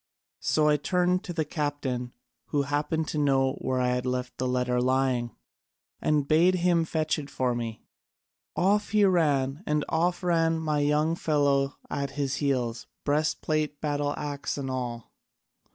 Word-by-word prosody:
So 155 Hz, -1 st, +2 dB
I 150 Hz, 0 st, +4 dB
turned 180 Hz, +4 st, +1 dB
to 180 Hz, -, -5 dB
the 160 Hz, -2 st, -1 dB
captain 145 Hz, -5 st, -3 dB, 0.3 s
who 145 Hz, -2 st, 0 dB
happened 150 Hz, +3 st, -1 dB
to 155 Hz, -, -2 dB
know 135 Hz, -2 st, +2 dB
where 130 Hz, -1 st, 0 dB
I 125 Hz, 0 st, +2 dB
had 125 Hz, 0 st, -1 dB
left 125 Hz, 0 st, -2 dB
the 130 Hz, -, 0 dB
letter 125 Hz, -1 st, +1 dB
lying, 130 Hz, -2 st, +1 dB, 0.7 s
and 150 Hz, -2 st, +1 dB
bade 170 Hz, +5 st, +4 dB
him 175 Hz, -2 st, +2 dB
fetch 155 Hz, -1 st, 0 dB
it 145 Hz, -1 st, -8 dB
for 125 Hz, -1 st, 0 dB
me. 115 Hz, -2 st, -5 dB, 0.7 s
Off 200 Hz, +4 st, +2 dB
he 210 Hz, -1 st, +4 dB
ran, 145 Hz, -6 st, +2 dB
and 150 Hz, -1 st, +1 dB
off 175 Hz, +3 st, 0 dB
ran 165 Hz, -2 st, +2 dB
my 155 Hz, -2 st, 0 dB
young 150 Hz, +2 st, +2 dB
fellow 140 Hz, -3 st, +1 dB
at 140 Hz, 0 st, -2 dB
his 140 Hz, -1 st, -1 dB
heels, 125 Hz, -5 st, -1 dB, 0.2 s
breast 150 Hz, +1 st, 0 dB
plate, 155 Hz, -2 st, -1 dB
battle 145 Hz, -1 st, -1 dB
axe, 145 Hz, -1 st, -3 dB
and 135 Hz, -2 st, -3 dB
all. 120 Hz, -3 st, -5 dB
145 Hz, 160 wpm, -27 LUFS, 130-160 Hz, 0.7 s, I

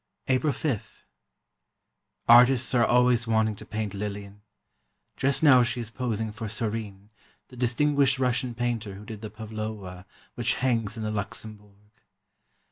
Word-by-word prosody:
April 130 Hz, +3 st, +2 dB
5: 135 Hz, -6 st, -4 dB, 1.2 s
Artists 120 Hz, +1 st, +6 dB
are 120 Hz, -2 st, +4 dB
always 125 Hz, -1 st, +3 dB
wanting 110 Hz, -1 st, +2 dB
to -, -, -9 dB
paint 105 Hz, -2 st, -3 dB
Lillian. 100 Hz, 0 st, -6 dB, 0.7 s
Just 140 Hz, +3 st, 0 dB
now 130 Hz, -5 st, +7 dB
she 120 Hz, 0 st, -1 dB
is 115 Hz, -2 st, -5 dB
posing 110 Hz, -2 st, -3 dB
for 110 Hz, 0 st, -6 dB
Sorine, 105 Hz, -2 st, -4 dB, 0.4 s
the 125 Hz, -, -13 dB
distinguished 135 Hz, +2 st, +2 dB
Russian 125 Hz, -1 st, 0 dB
painter 115 Hz, -4 st, -2 dB
who 105 Hz, +2 st, -11 dB
did 105 Hz, -1 st, -8 dB
the 110 Hz, -, -6 dB
Pavlowa 110 Hz, -4 st, -7 dB, 0.3 s
which 120 Hz, -3 st, 0 dB
hangs 115 Hz, -4 st, -1 dB
in 110 Hz, -, -4 dB
the 110 Hz, -, -2 dB
Luxembourg. 105 Hz, -1 st, -7 dB
110 Hz, 135 wpm, -26 LUFS, 105-125 Hz, 1.2 s, now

